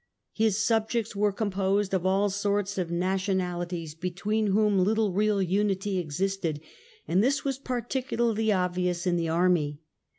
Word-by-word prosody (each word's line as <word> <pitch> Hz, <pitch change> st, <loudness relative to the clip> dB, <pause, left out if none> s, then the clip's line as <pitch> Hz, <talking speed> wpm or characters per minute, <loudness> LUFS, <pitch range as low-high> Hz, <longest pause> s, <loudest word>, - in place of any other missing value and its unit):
His 215 Hz, -2 st, +2 dB
subjects 220 Hz, +1 st, 0 dB
were 205 Hz, +1 st, +2 dB
composed 200 Hz, -1 st, 0 dB
of 185 Hz, -1 st, +1 dB
all 195 Hz, +1 st, +2 dB
sorts 200 Hz, 0 st, -1 dB
of 175 Hz, -2 st, -2 dB
nationahties 180 Hz, -2 st, -2 dB
between 195 Hz, +6 st, -1 dB
whom 205 Hz, 0 st, +3 dB
little 210 Hz, +1 st, +2 dB
real 205 Hz, 0 st, +2 dB
unity 195 Hz, +1 st, 0 dB
existed, 175 Hz, 0 st, -2 dB, 0.5 s
and 180 Hz, +6 st, +3 dB
this 275 Hz, +4 st, +1 dB
was 270 Hz, -1 st, -1 dB
particularly 240 Hz, -3 st, -1 dB
obvious 180 Hz, -2 st, 0 dB
in 180 Hz, -1 st, +2 dB
the 165 Hz, -1 st, -1 dB
army. 165 Hz, -4 st, +1 dB
195 Hz, 135 wpm, -27 LUFS, 180-210 Hz, 0.5 s, whom